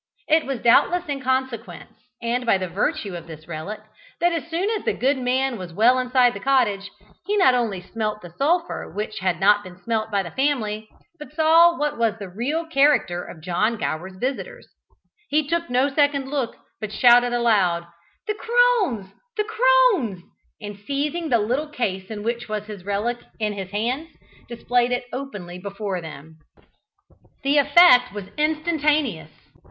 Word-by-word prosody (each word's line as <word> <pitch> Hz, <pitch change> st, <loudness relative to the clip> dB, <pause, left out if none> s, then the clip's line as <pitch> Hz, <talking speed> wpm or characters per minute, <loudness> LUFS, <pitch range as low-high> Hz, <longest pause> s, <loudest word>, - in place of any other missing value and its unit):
It 315 Hz, -1 st, +3 dB
was 270 Hz, -3 st, -3 dB
doubtless 350 Hz, +9 st, +4 dB
in 280 Hz, -2 st, -3 dB
consequence, 260 Hz, -3 st, -3 dB, 0.3 s
and 240 Hz, +2 st, -1 dB
by 230 Hz, -5 st, +3 dB
virtue 195 Hz, -, -2 dB
of 170 Hz, -1 st, -8 dB
this 155 Hz, -1 st, -11 dB
relic, 170 Hz, +6 st, -6 dB, 0.4 s
that 345 Hz, +1 st, +3 dB
as 330 Hz, -1 st, -3 dB
soon 340 Hz, +4 st, -1 dB
as 435 Hz, -3 st, -2 dB
the -, -, 0 dB
good 265 Hz, +1 st, +1 dB
man 255 Hz, -1 st, 0 dB
was 180 Hz, -2 st, -8 dB
well 240 Hz, +5 st, +4 dB
inside 250 Hz, -1 st, +3 dB
the 200 Hz, -, -7 dB
cottage, 210 Hz, -6 st, +1 dB, 0.4 s
he 415 Hz, +1 st, +1 dB
not 370 Hz, -10 st, +5 dB
only 225 Hz, -7 st, -1 dB
smelt 215 Hz, +1 st, -4 dB
the 175 Hz, -, -10 dB
sulphur 335 Hz, +5 st, -1 dB
which 215 Hz, +4 st, -4 dB
had 185 Hz, -2 st, -1 dB
not 205 Hz, +2 st, +4 dB
been 180 Hz, -2 st, -12 dB
smelt 220 Hz, +2 st, -2 dB
by 200 Hz, -2 st, 0 dB
the 170 Hz, -, -8 dB
family, 220 Hz, -6 st, -1 dB, 0.3 s
but 295 Hz, -3 st, -10 dB
saw 330 Hz, +2 st, +5 dB
what 295 Hz, -4 st, -2 dB
was 230 Hz, -2 st, +1 dB
the 200 Hz, -3 st, -8 dB
real 270 Hz, -, -2 dB
character 275 Hz, -, +2 dB
of 160 Hz, -, -11 dB
John 210 Hz, +6 st, 0 dB
Gower's 155 Hz, +4 st, -4 dB
visitors. 255 Hz, +8 st, -4 dB, 0.6 s
He 300 Hz, 0 st, +1 dB
took 340 Hz, +1 st, -1 dB
no 250 Hz, +3 st, +2 dB
second 280 Hz, -1 st, +1 dB
look, 270 Hz, -5 st, -2 dB, 0.2 s
but 215 Hz, -1 st, -5 dB
shouted 245 Hz, +2 st, +5 dB
aloud, 205 Hz, -8 st, +2 dB, 0.4 s
"The 425 Hz, -, -1 dB
crones! 430 Hz, -, +1 dB, 0.2 s
the 425 Hz, -, +2 dB
crones!" 445 Hz, -, +3 dB, 0.4 s
and 205 Hz, -2 st, -8 dB
seizing 290 Hz, +8 st, -2 dB
the 240 Hz, -, +4 dB
little 250 Hz, +8 st, -1 dB
case 190 Hz, -9 st, -3 dB
in 210 Hz, -2 st, -6 dB
which 235 Hz, +1 st, -3 dB
was 210 Hz, -1 st, -3 dB
his 210 Hz, -4 st, -9 dB
relic 210 Hz, +4 st, -1 dB, 0.2 s
in 210 Hz, -1 st, -1 dB
his 195 Hz, -2 st, -6 dB
hands, 245 Hz, +10 st, -2 dB, 0.4 s
displayed 240 Hz, +1 st, 0 dB
it 245 Hz, 0 st, -1 dB
openly 205 Hz, -10 st, -6 dB
before 200 Hz, -1 st, -4 dB
them. 160 Hz, 0 st, -11 dB, 1.0 s
The 280 Hz, +2 st, +3 dB
effect 285 Hz, -4 st, +6 dB
was 200 Hz, -2 st, -7 dB
instantaneous. 305 Hz, -1 st, 0 dB
240 Hz, 165 wpm, -23 LUFS, 205-290 Hz, 1.0 s, effect